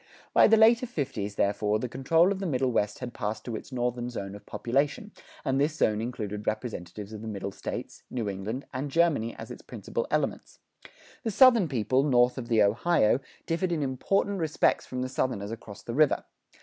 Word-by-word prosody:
By - - +7
the 225 - +6
later 230 +3 +5
fifties, 115 - -3
therefore, 105 +1 +1
the 125 - -3
control 160 +9 +3
of 195 - -2
the 195 - -2
Middle 130 -4 +1
West 105 -3 0
had 125 -2 -6
passed 105 -2 -4
to 120 - -4
its 110 - -8
Northern 125 -1 -2
zone 100 -5 -5
of 100 - -12
population, 140 - -1 0.3
and 135 +1 +1
this 150 +2 +1
zone 110 -7 +1
included 105 -4 -4
representatives 105 -2 -4
of 105 - -7
the 110 - -7
Middle 100 -2 -4
States, - - -6
New 115 -4 -3
England, 100 +7 -4
and 135 +3 -3
Germany 145 -7 +2
as - - -9
its - - -9
principal 480 0 -4
elements. - - -2 0.6
The 230 - -2
Southern 235 -4 +6
people, 130 -1 +1
north 125 -2 +3
of 120 - -6
the 110 -3 +4
Ohio, 115 +3 +3 0.3
differed 175 +2 -1
in 160 -3 0
important 195 +9 0
respects 160 -2 +1
from 125 0 -3
the - - -2
Southerners 125 -5 -2
across 110 -2 -9
the 115 - -5
river. 150 +2 +3
125 Hz, 190 wpm, -28 LUFS, 110-155 Hz, 0.6 s, By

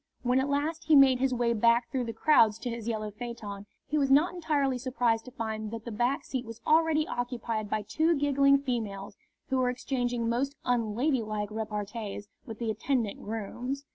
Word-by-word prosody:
When 250 +1 +3
at 270 +2 0
last 305 +3 -1
he 310 -1 +5
made 265 -2 +7
his 265 0 +1
way 240 -1 +1
back 235 +2 +3
through 255 -3 -1
the 230 - -3
crowds 225 -4 +4
to 245 - -4
his 230 -1 -6
yellow 215 -2 -2
phaeton, 210 -3 -7 0.2
he 300 - 0
was 275 -1 +1
not 295 +7 +4
entirely 285 -7 0
surprised 240 -3 0
to 255 - -10
find 220 -3 -4
that 225 0 -7
the 235 - -5
back 240 +6 0
seat 260 -2 -3
was 230 -1 -9
already 315 -1 +3
occupied 235 -3 -3
by 215 -1 -1
two 320 +10 +1
giggling 280 -1 +4
females, 215 -7 -3 0.3
who 265 - +1
were 250 -1 +2
exchanging 245 -2 -2
most 265 +5 -1
unladylike 225 -2 0
repartees 210 -1 -5 0.2
with 225 -2 -7
the 230 -1 -1
attendant 225 -1 -1
grooms. 240 +6 -5
240 Hz, 185 wpm, -29 LUFS, 220-275 Hz, 0.3 s, made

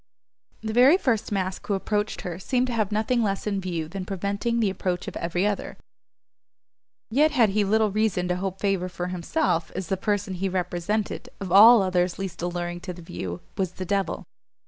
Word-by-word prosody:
The 220 0 -3
very 260 +9 +7
first 230 - 0
mask 190 -2 -2
who 205 - +1
approached 210 +2 -1
her 175 -1 -5
seemed 250 +5 +1
to 250 - -3
have 215 -3 0
nothing 220 +3 +1
less 195 -3 -1
in 200 -2 -1
view 170 -4 -3
than 190 +3 -5
preventing 200 +5 -2
the 210 -4 +2
approach 180 -1 -3
of - - -6
every 175 +3 -1
other: 205 -1 -2 1.3
yet 295 +6 +4
had 245 -8 +3
he 210 +2 +2
little 215 +1 +2
reason 205 -4 +1
to 180 - 0
hope 190 0 -4
favour 195 -3 0
for 180 0 -4
himself, 180 - -1
as 185 -2 -4
the 190 - 0
person 205 0 -1
he 190 +1 -2
represented, 185 +6 -2
of 195 -3 -5
all 215 +3 +9
others 180 -1 0
least 190 -3 -5
alluring 175 0 -3
to 180 0 -6
the 175 -1 -11
view, 90 - -6 0.2
was 185 -2 0
the 185 - -5
devil! 195 +1 -1
195 Hz, 190 wpm, -25 LUFS, 180-215 Hz, 1.3 s, all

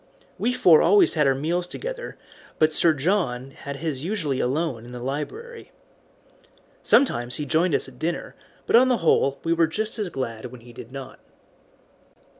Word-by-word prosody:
We 245 - +1
four 175 -10 +5
always 200 +5 +5
had 150 -3 +2
our 135 - +3
meals 170 +6 -1
together, - - -6 0.4
but 155 0 +3
Sir 165 0 +3
John 135 -5 -1
had 140 +1 -8
his 145 -2 -4
usually 165 -8 -2
alone 135 -2 -1
in 120 +1 -11
the 125 - -6
library. 420 - -6 1.1
Sometimes 120 - +2
he 150 - -3
joined 160 +2 +2
us - - 0
at 125 -2 -15
dinner, 170 +2 -3 0.3
but - - +2
on 250 +2 +7
the 250 -2 +2
whole 140 -3 +3
we 165 - +1
were 165 -1 +3
just 215 +7 -2
as 205 -4 -2
glad 115 -6 -5
when 125 -1 -10
he 120 +1 -14
did 115 +1 -11
not. 135 -1 -9
155 Hz, 175 wpm, -24 LUFS, 130-180 Hz, 1.1 s, on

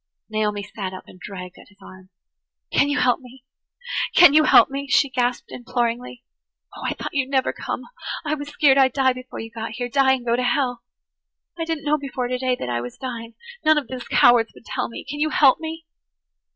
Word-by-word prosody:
Naomi 210 -1 -1
sat 195 -2 -6
up 185 - -9
and 185 - -16
dragged 180 -1 -9
at - - -16
his 205 - -24
arm. 185 -1 -14 0.6
"Can 285 - +3
you 290 - 0
help 250 -1 +2
me? 255 0 -15 0.7
Can 350 -5 +8
you 310 0 +6
help - - +6
me?" 280 +1 -4
she 280 0 +3
gasped 245 -1 -1
imploringly. 245 0 -3 0.5
"Oh, - - -10
I - - -2
thought - - -6
you'd 275 -3 0
never 265 -2 +1
come! - - -5 0.4
I 300 - 0
was 290 -1 -4
skeered 285 -2 +4
I'd 260 -2 +4
die 260 -2 +3
before 255 0 -10
you 225 0 -7
got 225 -1 -6
here–die 265 +3 +2
and 255 -2 -3
go 235 0 +2
to 250 - -1
hell. 245 -1 0 0.7
I 330 -1 -3
didn't 325 -2 -3
know 300 +1 +2
before 265 -3 -4
today 255 0 0
that - - -4
I 120 -1 -1
was 120 0 -8
dying. 235 -3 -7 0.3
None 310 0 +5
of 295 - -2
those 255 -2 -7
cowards 240 -2 +4
would - - -17
tell 255 -1 -3
me. 230 - -9
Can 290 +1 -5
you 310 +1 +1
help 280 -3 +5
me?" 320 0 -6
255 Hz, 210 wpm, -22 LUFS, 230-280 Hz, 0.7 s, Can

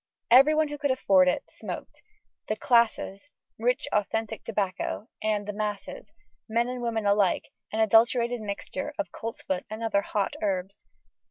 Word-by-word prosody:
Everyone 300 +5 +6
who 295 0 -6
could 285 0 0
afford 195 -8 +4
it, 180 - +1
smoked: - - -8 0.5
the 215 - 0
"classes," 235 -1 +1 0.3
rich 250 +6 +1
authentic 220 +1 -1
tobacco, 205 +1 -2
and 215 -1 0
the 210 - -3
"masses," 205 -1 -5 0.4
men 235 +2 +2
and 250 0 -4
women 225 -3 -1
alike, 200 -2 +2 0.2
an 220 - 0
adulterated 235 +2 +4
mixture 280 +8 -5
of 305 - -3
coltsfoot 205 -5 -4
and 220 +2 -6
other 215 -3 +2
"hot" 200 -1 -1
herbs. 195 -1 -2
220 Hz, 145 wpm, -27 LUFS, 200-240 Hz, 0.5 s, Everyone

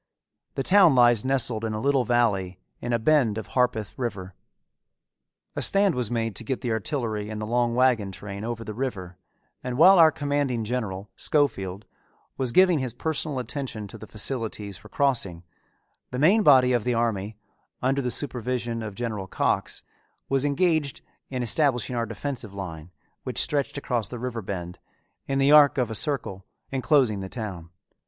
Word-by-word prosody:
The 135 - -1
town 185 -5 +6
lies 120 -3 +5
nestled 125 -4 +1
in 110 -1 -2
a 110 - -3
little 135 0 +1
valley 105 -7 +1 0.2
in 120 - -4
a 120 - +3
bend 115 -3 +2
of 110 - -6
Harpeth 120 -5 0
River. 100 -7 -4 1.2
A - - -2
stand 200 -2 +3
was 125 -5 -2
made 115 -3 -2
to - - -4
get 130 +3 -3
the 120 - -2
artillery 110 -2 -2
and 110 -1 -5
the 105 - -3
long 120 +1 0
wagon 120 -6 +2
train 100 +2 -8
over 115 0 -4
the 110 - -6
river 100 -7 -5 0.4
and 125 -1 -4
while 185 +4 +7
our 160 -1 +8
commanding 145 -6 -1
general, 105 -4 -4
Schofield, 100 -10 0 0.5
was 130 -3 -1
giving 180 +1 +5
his 125 -3 -4
personal 155 -1 -2
attention 125 -4 -5
to 115 - -10
the 110 - -10
facilities 110 -3 -4
for 90 - -13
crossing, 115 - -1 0.7
the 125 - -5
main 180 - +4
body 130 -7 +5
of 120 -3 +1
the 125 -1 0
army, 110 -3 -1 0.4
under 135 +2 0
the 125 - -2
supervision 120 -3 -1
of 105 -3 -6
General 110 -5 -4
Cox, - - -1 0.4
was 135 0 +1
engaged 145 -1 0 0.3
in 130 -2 -3
establishing 125 -1 +1
our 115 -1 -1
defensive 115 -2 -5
line, 85 -4 -7 0.3
which - - -6
stretched 145 -1 +1
across 120 -6 -2
the 120 - -7
river 120 -1 -4
bend, 90 -3 -6 0.5
in 135 - -1
the 135 +1 +3
arc 150 -2 +7
of 125 -3 0
a - - -2
circle, 110 -6 -3 0.3
inclosing 130 -5 +2
the 95 0 -6
town. 95 -8 -6
120 Hz, 170 wpm, -25 LUFS, 105-135 Hz, 1.2 s, our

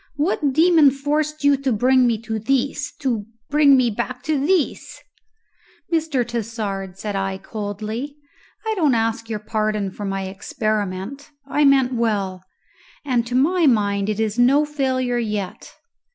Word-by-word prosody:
What 295 -2 0
demon 320 0 +5
forced 295 +2 -2
you 285 0 +5
to 270 -1 -1
bring 250 +3 +4
me 230 -2 0
to 220 -1 -3
this 275 +5 -1
to 235 -7 -1 0.2
bring 290 -2 +6
me 245 -2 +2
back 250 +4 -4
to 305 -2 0
this?" 345 -1 0 0.9
"Mr. 310 -7 0
Tassard," 210 -5 -4
said 205 -1 -4
I 195 0 -2
coldly, 215 +7 -5 0.5
"I 440 - 0
don't 310 - +2
ask 225 0 -1
your 220 - -2
pardon 215 -2 -2
for 205 - -7
my 195 0 -2
experiment; 205 +5 -3 0.2
I 290 +1 +1
meant 265 -2 +4
well, 200 -6 -1 0.6
and 245 -4 0
to 245 - -3
my 325 +5 +3
mind 205 -4 +2
it 215 0 -2
is 220 +1 -1
no 275 +5 +5
failure 260 -4 -1
yet. 210 -5 -4
240 Hz, 150 wpm, -21 LUFS, 210-280 Hz, 0.9 s, bring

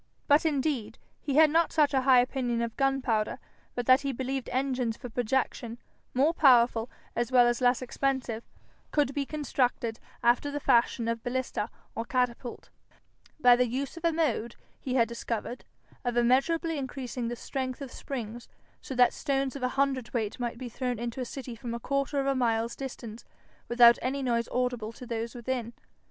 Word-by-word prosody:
But 295 +2 +5
indeed 270 -7 -1 0.2
he 280 -2 -3
had 310 0 +7
not 330 +2 +3
such 300 -3 +3
a 265 - +3
high 255 -1 +6
opinion 245 -2 -1
of 230 -1 -4
gunpowder 265 -6 +1 0.4
but 245 - -2
that 255 +2 +6
he 280 -1 -1
believed 265 +1 -3
engines 250 -3 -1
for 245 - -8
projection, 240 0 -1 0.4
more 285 +6 +3
powerful 245 -6 +4 0.3
as 240 +1 -1
well 250 -1 +6
as 240 +1 +1
less 250 0 +3
expensive, 255 -3 -2 0.5
could 290 -2 +1
be 280 -1 -2
constructed, 250 -6 -1 0.2
after 240 +4 +3
the 290 0 -3
fashion 235 -3 +2
of 230 0 -1
ballista 245 -3 -2 0.2
or 230 - -3
catapult, 245 0 -2 0.7
by 245 -3 +7
the 250 0 +2
use 265 +3 -3
of 335 - -10
a 335 - +3
mode 265 -8 -1 0.2
he 255 -1 -3
had 230 -3 +4
discovered 235 +1 -4 0.4
of 245 -1 -1
immeasurably 285 +7 +2
increasing 255 -2 -4
the 240 - -3
strength 260 +1 -4
of 275 -3 -7
springs, 240 -3 -6 0.3
so 265 - -6
that 245 0 +5
stones 275 -2 -1
of 280 - -6
a 255 - +1
hundredweight 255 -5 0
might 240 -1 -3
be 255 0 -6
thrown 250 0 -3
into 235 +3 -4
a - - -2
city 250 -1 -7
from 235 0 -5
a - - -4
quarter 275 +3 -1
of 270 - 0
a 275 - +2
mile's 230 -2 0
distance 235 -4 -7 0.4
without 235 0 +7
any 275 +2 -2
noise 235 -2 0
audible 245 -3 -1
to 250 - -11
those 230 0 -4
within. 240 -1 -3
250 Hz, 175 wpm, -29 LUFS, 235-270 Hz, 0.7 s, had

